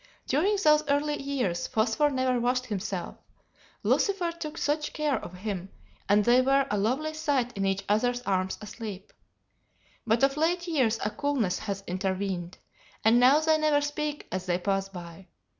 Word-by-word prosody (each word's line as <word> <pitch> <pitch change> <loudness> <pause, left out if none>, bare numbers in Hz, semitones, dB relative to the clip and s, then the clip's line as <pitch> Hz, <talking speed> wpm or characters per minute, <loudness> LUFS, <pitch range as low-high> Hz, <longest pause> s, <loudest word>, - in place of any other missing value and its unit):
During 355 +10 +2
those 300 0 +5
early 290 +1 0
years 255 -11 -1
Phosphor 225 +7 +2
never 260 -2 +1
washed 250 +1 0
himself, 200 -4 -4 0.7
Lucifer 385 -4 +1
took 330 -1 -7
such 300 +1 -1
care 300 -3 -1
of 180 - -8
him, 190 -1 -5 0.4
and 205 0 +4
they 245 +2 +5
were 270 +1 +3
a 210 - +1
lovely 270 +9 0
sight 275 -6 -1
in 195 0 0
each 195 0 -1
other's 245 +4 +1
arms 190 -3 -1
asleep. 210 -2 -8 0.9
But 230 +3 +2
of 275 +1 +3
late 345 +3 +1
years 255 -9 +2
a 210 - 0
coolness 270 -10 -1
has 200 -2 -4
intervened, 185 -1 -3 0.5
and 230 +2 +6
now 265 +5 +6
they 315 0 +3
never 305 -1 +3
speak 295 0 -3
as 185 0 -4
they 175 -1 +1
pass 195 +1 -1
by. 175 0 -10
245 Hz, 160 wpm, -28 LUFS, 195-295 Hz, 0.9 s, and